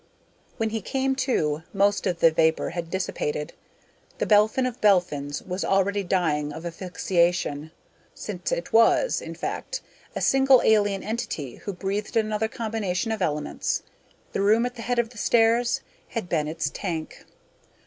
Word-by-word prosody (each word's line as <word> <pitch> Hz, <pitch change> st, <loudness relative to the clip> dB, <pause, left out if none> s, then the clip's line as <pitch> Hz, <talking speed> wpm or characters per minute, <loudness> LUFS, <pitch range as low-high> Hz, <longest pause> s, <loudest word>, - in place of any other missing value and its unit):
When 225 Hz, -2 st, -1 dB
he 225 Hz, 0 st, -2 dB
came 265 Hz, +5 st, 0 dB
to, 160 Hz, -, 0 dB
most 200 Hz, 0 st, +2 dB
of 175 Hz, -2 st, -2 dB
the 165 Hz, -, +7 dB
vapor 160 Hz, 0 st, +2 dB
had 170 Hz, -1 st, -5 dB
dissipated. 150 Hz, -5 st, -3 dB, 0.6 s
The -, -, 0 dB
Belphin 215 Hz, +4 st, +4 dB
of 250 Hz, -2 st, -4 dB
Belphins 150 Hz, -8 st, +2 dB
was 185 Hz, +1 st, -3 dB
already 195 Hz, +1 st, +2 dB
dying 160 Hz, -6 st, 0 dB
of 160 Hz, +3 st, -8 dB
asphyxiation, 170 Hz, -3 st, 0 dB, 0.5 s
since -, -, -5 dB
it -, -, -3 dB
was, 230 Hz, -, +4 dB
in -, -, -7 dB
fact, -, -, -4 dB, 0.3 s
a -, -, -1 dB
single 270 Hz, -1 st, +5 dB
alien 205 Hz, -3 st, +3 dB
entity 180 Hz, -, -4 dB
who 200 Hz, -, -5 dB
breathed 200 Hz, +4 st, -3 dB
another 215 Hz, 0 st, +1 dB
combination 220 Hz, -2 st, -2 dB
of 220 Hz, -2 st, -3 dB
elements. 150 Hz, -4 st, -1 dB, 0.5 s
The -, -, 0 dB
room 220 Hz, +4 st, +4 dB
at 245 Hz, -, -3 dB
the 235 Hz, -, -9 dB
head 245 Hz, +1 st, -1 dB
of 235 Hz, -1 st, +1 dB
the 235 Hz, -, -10 dB
stairs 235 Hz, +2 st, +3 dB, 0.3 s
had 230 Hz, -6 st, -4 dB
been 155 Hz, -3 st, 0 dB
its 155 Hz, -2 st, -2 dB
tank. 165 Hz, -5 st, -5 dB
200 Hz, 155 wpm, -25 LUFS, 170-225 Hz, 0.6 s, the